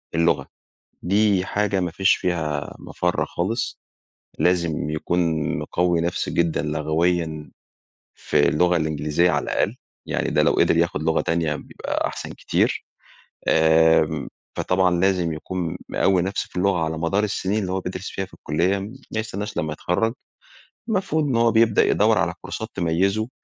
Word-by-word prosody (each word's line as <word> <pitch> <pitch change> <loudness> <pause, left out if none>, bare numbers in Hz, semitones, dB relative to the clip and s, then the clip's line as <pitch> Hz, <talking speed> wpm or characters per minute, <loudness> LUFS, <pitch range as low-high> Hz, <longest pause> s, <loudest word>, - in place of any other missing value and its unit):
اللغة 80 -5 +2 0.6
دي 100 0 +2
حاجة 100 -1 0
ما 90 -2 -1
فيش 95 +4 +3
فيها 75 -5 -2
مفر 90 0 -1
خالص، 110 +8 -2 0.6
لازم 85 -2 +1
يكون 85 +3 -1 0.4
مقوي 85 -1 0
نفسه 85 +1 -2
جدًا 85 -1 +1
لغويًا 80 +1 -1 0.7
في 75 - +2
اللغة 90 +4 +3
الإنجليزية 80 +2 +1
على - - 0
الأقل، - - 0 0.3
يعني - - -1
ده - - +2
لو - - +4
قدر - - +3
يأخد 85 -2 0
لغة 80 0 +2
تانية 80 -2 0
بيبقى - - -3
أحسن - - -6
كتير. - - 0 0.6
آمم 80 -1 +4 0.3
فطبعًا 90 -2 +2
لازم 90 -3 +2
يكون 85 +2 -4
مقوي 95 -2 +2
نفسه 95 +2 -2
في - - -14
اللغة 95 -1 +2
على 80 0 -3
مدار 95 +6 +1
السنين 100 0 -1
اللي 95 -3 -2
هو 95 - -1
بيدرس 95 +1 -5
فيها 95 - -3
في 95 - -15
الكلية 85 +7 0
ما 105 +6 -7 0.3
يستناش 105 -1 -5
لمّا 80 -1 -1
يتخرج. 110 +9 -1 0.7
المفروض 185 -7 0
إن 135 -5 0
هو 115 0 +4
بيبدأ 110 -2 +4
يدور - - +3
على - - 0
كورسات 110 - -5
تميزه 95 +6 +1
90 Hz, 150 wpm, -23 LUFS, 80-95 Hz, 0.7 s, لو